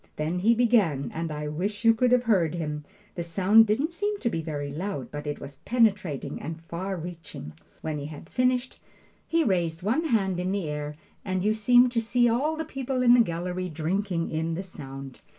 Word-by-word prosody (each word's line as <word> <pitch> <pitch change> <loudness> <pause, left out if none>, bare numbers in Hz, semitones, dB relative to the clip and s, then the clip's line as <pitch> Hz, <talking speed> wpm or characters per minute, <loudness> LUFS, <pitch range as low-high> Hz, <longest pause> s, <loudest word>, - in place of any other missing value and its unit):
Then 160 +4 -1
he 225 +5 +4
began, 215 - +2
and 165 0 -3
I 150 0 -4
wish 200 +9 -3
you 225 - +8
could 245 +2 +2
have 250 -1 +4
heard 185 -9 +2
him! 150 -3 -4 0.3
The 175 - -4
sound 195 +6 +5
didn't 275 +11 0
seem 415 +3 -1
to 235 - 0
be 165 - -2
very 145 -3 -4
loud, 155 -4 -4
but 145 0 -6
it 145 - -3
was 140 -1 -9
penetrating 190 - 0
and 160 +2 -5
far 180 +4 -4
reaching. 165 - -8 0.3
When 155 -2 -3
he 145 - -5
had 155 +1 -10
finished, 255 +2 0 0.5
he 330 0 +2
raised 175 - 0
one 250 - +1
hand 195 - +1
in 180 +1 -1
the 195 -5 -1
air, 150 0 -4 0.3
and 185 -2 -1
you 215 +1 +3
seemed 245 +3 +5
to 235 -2 +1
see 240 +2 +2
all 275 +7 +1
the 320 0 -3
people 265 -1 -2
in 240 -1 +7
the 245 - +6
gallery 180 -2 -1
drinking 170 +2 -1
in 160 +1 -1
the 185 - -3
sound. 135 -6 -9
185 Hz, 205 wpm, -27 LUFS, 160-230 Hz, 0.5 s, you